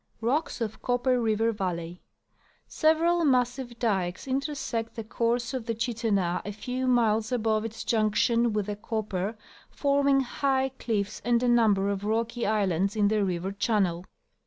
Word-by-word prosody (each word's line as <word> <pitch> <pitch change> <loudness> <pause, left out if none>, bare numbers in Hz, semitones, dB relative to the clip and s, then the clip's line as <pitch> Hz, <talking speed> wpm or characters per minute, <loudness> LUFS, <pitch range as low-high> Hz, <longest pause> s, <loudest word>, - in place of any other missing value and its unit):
Rocks 255 +4 -1
of 220 -2 -4
Copper 245 0 +1
River 225 0 +1
Valley. 180 -4 -4 0.4
— - - -38 0.2
Several 335 +2 +2
massive 250 -3 +1
dikes 190 -4 -1
intersect 265 -4 -2
the 225 - -5
course 235 +2 -1
of 255 -4 -4
the 230 - -1
Chittenah 215 -6 0
a 205 - -5
few 250 +5 -3
miles 225 -3 +2
above 220 -2 +1
its 225 0 -6
junction 230 +2 +2
with 210 -1 -1
the 205 0 -3
Copper, 210 -1 -3 0.3
forming 280 -1 +2
high 265 +1 0
cliffs, 205 -3 -2
and 240 +1 +2
a - - +2
number 220 -5 +3
of 200 0 -3
rocky 230 +2 -1
islands 195 -2 +1
in 205 -2 +3
the 215 -1 +1
river 185 0 -2
channel. 195 -4 0
225 Hz, 155 wpm, -27 LUFS, 205-245 Hz, 0.4 s, number